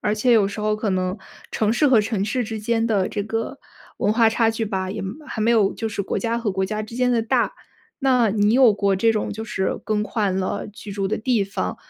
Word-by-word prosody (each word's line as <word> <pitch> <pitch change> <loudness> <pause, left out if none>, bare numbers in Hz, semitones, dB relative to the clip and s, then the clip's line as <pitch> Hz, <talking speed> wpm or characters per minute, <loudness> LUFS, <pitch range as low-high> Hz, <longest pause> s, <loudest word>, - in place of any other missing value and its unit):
而 210 - 0
且 235 +3 +2
有 205 -4 +4
时 210 - -8
候 215 0 +1
可 215 -1 -2
能 185 +1 -1 0.4
城 215 0 +1
市 290 +5 +3
和 245 -5 +5
城 210 -2 -1
市 245 +4 -1
之 220 -1 -5
间 225 +1 0
的 205 -5 +1
这 205 - -3
个， 225 +5 -4 0.4
文 210 - +2
化 225 0 +4
差 225 0 +2
距 225 0 -2
吧， 190 -3 -3
也 195 - -4
没 190 0 -5
还 270 - -6
没 230 +2 +3
有 210 -4 +3
就 225 - -4
是 205 -1 -3
国 - - -2
家 230 -1 -1
和 230 -3 -1
国 190 0 -1
家 215 +2 -3
之 220 +2 -9
间 250 0 +2
的 230 -2 +2
大。 225 - +1 0.5
那 250 -5 +3
你 205 +1 +2
有 255 -3 +6
过 200 -1 +1
这 225 +4 +3
种 215 -2 -2
就 220 - -6
是 190 -3 -2
更 210 -1 0
换 200 -2 -1
了 190 +2 -3
居 205 0 -9
住 195 -1 -2
的 215 - -1
地 230 -1 +1
方， 195 0 -3
215 Hz, 270 characters per minute, -22 LUFS, 200-230 Hz, 0.5 s, 有